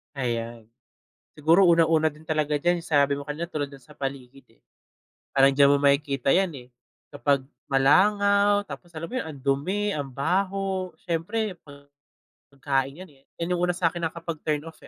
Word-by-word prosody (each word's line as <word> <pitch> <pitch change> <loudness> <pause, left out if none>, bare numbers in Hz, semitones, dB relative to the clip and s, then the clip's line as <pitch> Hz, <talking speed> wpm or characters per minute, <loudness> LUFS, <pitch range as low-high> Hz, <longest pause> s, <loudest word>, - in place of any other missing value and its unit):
Ayan. 115 -3 -3 0.7
Siguro 160 +5 +4
una-una 165 -1 +4
din 155 +1 -17
talaga 155 -2 0
diyan, 175 +3 +1
sabi 145 -3 +2
mo 140 - -3
kanina, 150 +4 -5
tulad 150 -4 -4
nung 140 - -12
sa 120 - -17
paligid 135 -3 -8
eh. - - -41 0.7
Parang 135 0 +4
di 140 - +2
mo 145 - +4
makikita 140 -1 +2
'yan 190 0 +3 0.2
eh, - - -24 0.5
kapag 135 +2 +1 0.2
malangaw, 200 +8 +4
tapos 145 +1 -10
alam 160 - -4
mo 165 - -11
'yon, - - -8
ang 150 - -9
dumi, 150 +10 -1
ang 140 -2 -4
baho, 185 +6 -1
siyempre, 185 +5 -2 1.0
pagkain 135 +3 -2
'yan - - -17
eh, 135 -1 -25
yan 170 +1 -2
'yong 175 - 0
una 180 - +1
sa 165 -3 +1
akin 170 -2 -2
nakapag-turn 160 -2 -4
off, 165 -1 -12
155 Hz, 165 wpm, -25 LUFS, 140-175 Hz, 1.0 s, Siguro